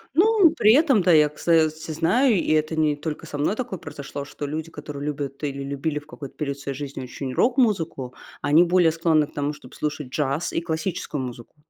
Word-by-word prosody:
Ну, 395 -2 +5
при 215 +2 +5
этом 280 - +4
да, 180 - +3
я, 150 -2 +6
кстати, 160 0 +1
знаю, 210 - +3
и 170 - 0
это 155 +1 +1
не 155 -2 +2
только 150 +1 -5
со 145 - -6
мной 150 +9 +1
такое 235 -8 -4
произошло, 145 -1 -7
что 145 - -7
люди, 155 +3 -4
которые 145 -2 -8
любят 140 -1 -4
или 140 -1 -3
любили 140 +2 -3
в 145 - -19
какой-то 140 -4 -10
период 140 -2 -3
своей 135 -1 -5
жизни 140 -2 -6
очень 130 +1 -6
рок-музыку, 195 - +1 0.3
они 155 +4 +5
более 175 -2 +4
склонны 160 -2 +2
к - - -20
тому, 145 +1 -2
чтобы 140 -3 -14
слушать 150 -3 -3
джаз 145 +3 -1
и - - 0
классическую 160 -3 -3
музыку. 120 +2 -9
155 Hz, 200 wpm, -24 LUFS, 140-170 Hz, 0.3 s, я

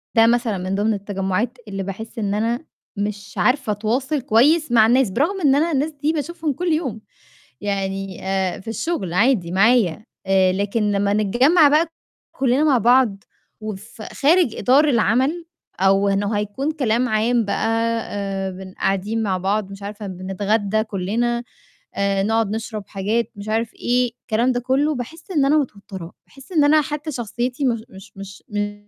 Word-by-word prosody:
ده 225 0 +6
مثلًا 235 -4 +1
من 195 - 0
ضِمن 210 +2 +1
التجمُّعات 200 +4 -2
اللي 195 -1 -4
باحس 220 +5 -7
إن 200 -2 -1
أنا 230 +7 -1 0.3
مش 205 0 -4
عارفة 255 -3 +2
أتواصل 250 +8 -1
كويس 275 +6 +3
مع 225 -2 +6
الناس، 245 -1 +3
برغم 335 - 0
إن 280 -4 +4
أنا 320 +4 +2
الناس 295 +2 0
دي 305 +2 +1
باشوفهم 320 -1 -2
كل 350 +2 -1
يوم 260 -9 -2 0.6
يعني 195 -1 -3
آآ 190 -2 -1
في 190 - -20
الشُغل 225 - -3
عادي، 200 -3 +2
معايا، 215 -1 +3 0.2
آآ 190 -1 +4
لكن 205 +2 0
لمّا 200 0 +1
نتجمّع 255 - +4
بقى 305 +3 +4
ت - - -22 0.4
كلّنا 265 +2 +1
مع 290 -4 +4
بعض 235 -3 +3 0.4
وف 215 +1 -8
خارج 290 - +2
إطار 285 +4 +4
العمل 260 +8 +1 0.4
أو 195 +1 +4
إنه 205 +2 0
هيكون 210 +9 -2
كلام 250 -5 0
عام 225 +1 +2
بقى 205 - -1 0.4
آآ 195 -1 -3
بن 185 0 -10
قاعدين 205 +4 -1
مع 190 -3 0
بعض 200 +1 -1
مش 195 0 -10
عارفة 205 0 -6
بنتغدى 200 +3 -1
كلّنا، 225 +4 -1 0.5
آآ 200 0 +1
نقعُد 225 0 +1
نشرب 220 -1 -4
حاجات 215 +4 -1
مش 205 +1 -8
عارف 225 +1 -1
إيه 245 0 0
الكلام 235 +3 +1
ده 245 - -1
كلّه 270 +5 +1
باحس 315 - -8
إن 295 -5 +2
أنا 300 +2 +4
مِتوترة، 200 - -5
باحس 275 +6 -16
إن 305 -4 +4
أنا 305 +2 +5
حتى 300 +2 -5
شخصيتي 245 +2 -3
مش 230 -3 0
مش 190 0 -13
مش 195 0 -10
مش 205 0 -2
220 Hz, 165 wpm, -21 LUFS, 200-265 Hz, 0.6 s, ده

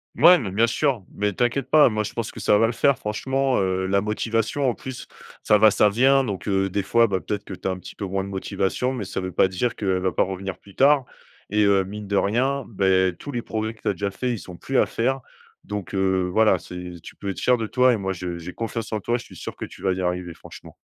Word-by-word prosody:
Mouais, 180 0 +8
mais 105 -8 -4
bien 115 +4 +3
sûr, 130 -3 0
mais 105 0 0
t'inquiète 125 +4 -1
pas, 155 -4 +7
moi 110 -1 -1
je - - -6
pense 115 -1 -3
que - - -10
ça 105 - +3
va 115 - +4
le - - -1
faire 135 +2 +2
franchement, 130 +5 0
heu, 95 0 0
la 100 +1 +2
motivation 115 +5 0
en - - -2
plus, 130 -1 -8 0.3
ça 105 - +4
va, 110 0 +6
ça 105 - +4
vient 135 +6 +4
donc, 100 -5 -5
heu, 95 -1 +1
des 100 +1 -1
fois 115 +3 +3
bah 95 -2 -1
peut-être 105 +1 -4
que 95 - -7
tu - - -5
as - - +1
un 95 - -5
petit - - -11
peu 100 - -5
moins 95 0 -2
de 100 - -7
motivation, 100 +6 -1
mais 110 -6 -4
ça 95 - -4
veut 95 0 -4
pas 90 - +3
dire 95 +6 -2
qu'elle 95 -3 0
va 95 0 0
pas - - 0
revenir 95 -1 -3
plus 100 -2 -18
tard, 140 -1 +4 0.4
et 105 +1 +2
heu, 100 -1 +4
mine 105 +2 -7
de 100 - -1
rien, 130 +8 +1
beh, 95 -3 +2
tous 145 - -7
les 120 -2 -2
progrès 110 0 -3
que 110 - -23
tu - - -6
as - - +3
déjà 100 +2 -3
fait, 125 +4 -2
ils 115 - -2
sont 90 -3 -10
plus 135 +8 -2
à - - +5
faire, 130 +4 -1 0.4
donc 105 -1 -5
heu, 95 -1 +1
voilà, 105 -3 +4
c'est 90 0 -8
tu - - -12
peux 100 - -6
être 95 - -4
fier 125 -1 +4
de 115 - -2
toi 125 +3 +3
et 115 - +1
moi, 95 -1 -2
je 90 -1 -5
j'ai 85 +2 -8
confiance 115 -1 -4
en 105 - 0
toi, 120 +5 0
je - - -9
suis - - -15
sûr - - -7
que - - -6
tu - - -14
vas 95 -1 +1
y 95 - -4
arriver 90 -1 -2
franchement. - - -13
105 Hz, 275 wpm, -23 LUFS, 95-120 Hz, 0.4 s, Mouais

